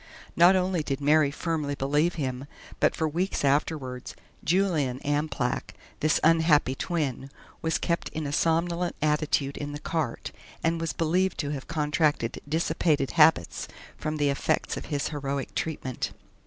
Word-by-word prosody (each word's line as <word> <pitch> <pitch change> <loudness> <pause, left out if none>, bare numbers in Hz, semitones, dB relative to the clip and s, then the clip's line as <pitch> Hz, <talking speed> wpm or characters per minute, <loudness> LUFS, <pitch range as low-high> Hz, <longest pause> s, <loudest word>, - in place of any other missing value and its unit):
Not 175 +3 +7
only 185 -2 +1
did 140 -2 -2
Mary 150 0 +4
firmly 150 -1 -2
believe 145 +6 +1
him, 135 -3 -3 0.3
but - - +3
for 160 - 0
weeks 170 +1 -1
afterwards 135 -3 -1 0.3
"Julian 160 -8 +1
Amplach" 145 -4 -1 0.2
this 155 0 +2
unhappy 160 -4 +4
twin 140 -4 -2 0.3
was 160 0 +1
kept 170 -1 -1
in 155 -1 -4
a 140 - -3
somnolent 170 +3 +1
attitude 150 -2 +1
in 145 0 -5
the 145 - -5
cart, 155 -6 -3 0.3
and 165 0 +1
was 165 - -1
believed 180 +3 +1
to 145 -1 -3
have 140 -3 -5
contracted 150 -5 0
dissipated 160 -3 +1
habits 155 - +4 0.3
from 155 0 -3
the 145 -1 +2
effects 140 - 0
of - - -6
his 145 -2 -2
heroic 140 -2 -3
treatment. 140 -5 -3
150 Hz, 145 wpm, -27 LUFS, 140-165 Hz, 0.3 s, Not